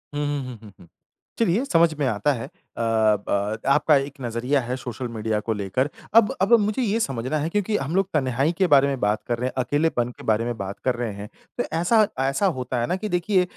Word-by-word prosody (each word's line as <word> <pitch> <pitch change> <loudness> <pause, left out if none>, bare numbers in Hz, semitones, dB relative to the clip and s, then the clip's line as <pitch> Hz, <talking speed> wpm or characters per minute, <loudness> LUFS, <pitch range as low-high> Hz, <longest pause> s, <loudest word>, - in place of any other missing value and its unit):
हुँ, 145 - -1
हुँ, 145 -1 -2
हुँ, 125 -2 -8
हुँ, 105 - -12
हुँ। 85 - -16 0.5
चलिए 225 +2 +2
समझ 165 - +3
में 140 - +1
आता 120 +5 +1
है 115 -2 -5
अ, - - -18 0.3
ब 110 -2 +1
आपका 150 +2 +4
एक 135 0 0
नजरिया 125 +4 0
है, 125 +1 -3
सोशल 125 0 -5
मीडिया 110 -2 -2
को 110 +1 -2
लेकर। 105 +8 -1 0.2
अब 225 -2 +6
अब 200 +5 +3
मुझे 210 +5 0
ये 225 0 +1
समझना 135 - -1
है 155 +3 -1
क्योंकि 210 +2 0
हम 145 +6 -3
लोग 195 -1 +2
तन्हाई 135 +1 +1
के 190 -2 +3
बारे 140 0 +6
में 135 -2 -2
बात 105 +1 +1
कर 120 -1 0
रहे 125 - -1
हैं, - - -5
अकेलेपन 135 -2 0
के - - -12
बारे 110 +1 +1
में 120 -1 -3
बात 100 0 -6
कर 130 -2 +2
रहे 120 -3 -3
हैं, 100 +1 -8 0.3
तो - - +1
ऐसा 215 +5 +4 0.2
ऐसा 140 +9 0
होता 125 -1 -2
है 120 - -1
ना 180 - 0
कि 215 - -1
देखिए 180 +1 +2
130 Hz, 235 wpm, -24 LUFS, 115-170 Hz, 0.5 s, अब